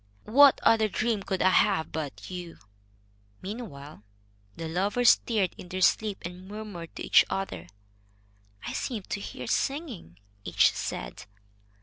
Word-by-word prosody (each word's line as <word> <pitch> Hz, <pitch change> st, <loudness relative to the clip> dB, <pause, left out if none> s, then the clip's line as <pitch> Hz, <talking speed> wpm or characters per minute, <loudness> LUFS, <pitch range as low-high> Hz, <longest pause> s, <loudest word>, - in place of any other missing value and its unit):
What 275 Hz, +5 st, +6 dB
other 220 Hz, -1 st, +4 dB
dream 220 Hz, +1 st, -1 dB
could 190 Hz, -1 st, -2 dB
I 185 Hz, -, +5 dB
have 190 Hz, -4 st, +2 dB
but 155 Hz, +2 st, -6 dB
you?" 175 Hz, -2 st, -7 dB, 0.8 s
Meanwhile, 180 Hz, -, -8 dB, 0.5 s
the 165 Hz, -, -5 dB
lovers 200 Hz, +9 st, +4 dB
stirred 210 Hz, -6 st, 0 dB
in 180 Hz, -, -10 dB
their 185 Hz, +1 st, -4 dB
sleep, 210 Hz, +1 st, +2 dB
and 180 Hz, +1 st, -8 dB
murmured 205 Hz, -5 st, -8 dB
to -, -, -5 dB
each -, -, +6 dB
other. 190 Hz, -, -4 dB, 1.0 s
"I -, -, -4 dB
seemed 220 Hz, -7 st, -4 dB
to 200 Hz, -, -1 dB
hear 125 Hz, -9 st, -7 dB
singing," 250 Hz, -, -3 dB, 0.3 s
each -, -, +4 dB
said. -, -, -5 dB
190 Hz, 135 wpm, -28 LUFS, 165-220 Hz, 1.0 s, What